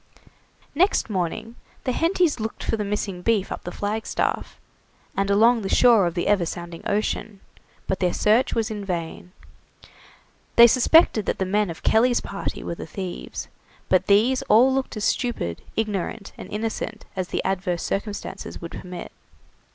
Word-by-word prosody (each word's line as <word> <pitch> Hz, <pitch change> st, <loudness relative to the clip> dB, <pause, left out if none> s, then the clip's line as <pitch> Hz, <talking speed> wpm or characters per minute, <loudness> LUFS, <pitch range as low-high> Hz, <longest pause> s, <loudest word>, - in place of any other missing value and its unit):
Next 335 Hz, -, +2 dB
morning 210 Hz, +5 st, -3 dB, 0.3 s
the 255 Hz, -, 0 dB
Hentys 330 Hz, -1 st, +1 dB
looked 220 Hz, +1 st, -4 dB
for -, -, 0 dB
the 215 Hz, -, -2 dB
missing 200 Hz, -2 st, -3 dB
beef 210 Hz, -1 st, +1 dB
up -, -, -5 dB
the 175 Hz, -, -4 dB
flagstaff, 210 Hz, +4 st, -2 dB, 0.6 s
and 195 Hz, 0 st, 0 dB
along 225 Hz, +4 st, +5 dB
the 195 Hz, -, -3 dB
shore 230 Hz, -6 st, +5 dB
of 170 Hz, -, -4 dB
the 175 Hz, -, -1 dB
ever 205 Hz, -3 st, +3 dB
sounding 170 Hz, 0 st, -6 dB
ocean, 205 Hz, 0 st, -2 dB, 0.5 s
but 190 Hz, -, -2 dB
their 180 Hz, -1 st, +2 dB
search 220 Hz, +8 st, +2 dB
was 225 Hz, -1 st, 0 dB
vain. 180 Hz, -4 st, -5 dB, 1.2 s
They 235 Hz, -, +10 dB
suspected 245 Hz, -, +5 dB
that -, -, 0 dB
the 190 Hz, -, -1 dB
men 205 Hz, +1 st, +1 dB
of 165 Hz, -, -8 dB
Kelly's 240 Hz, +2 st, +4 dB
party 200 Hz, -, -5 dB
were -, -, -3 dB
the 170 Hz, -, -8 dB
thieves, 185 Hz, 0 st, -6 dB, 0.4 s
but 185 Hz, -, +3 dB
these 235 Hz, +6 st, +4 dB
all 250 Hz, +5 st, +6 dB
looked 265 Hz, -4 st, -2 dB
as 210 Hz, -, -3 dB
stupid, 160 Hz, -, -1 dB
ignorant, 210 Hz, -1 st, -3 dB
and -, -, -10 dB
innocent 220 Hz, +1 st, -4 dB
as 185 Hz, -2 st, -2 dB
the -, -, -2 dB
adverse 185 Hz, -2 st, -1 dB
circumstances 205 Hz, +1 st, -4 dB
would 170 Hz, -, -8 dB
permit. 180 Hz, -1 st, -8 dB
205 Hz, 160 wpm, -24 LUFS, 185-230 Hz, 1.2 s, They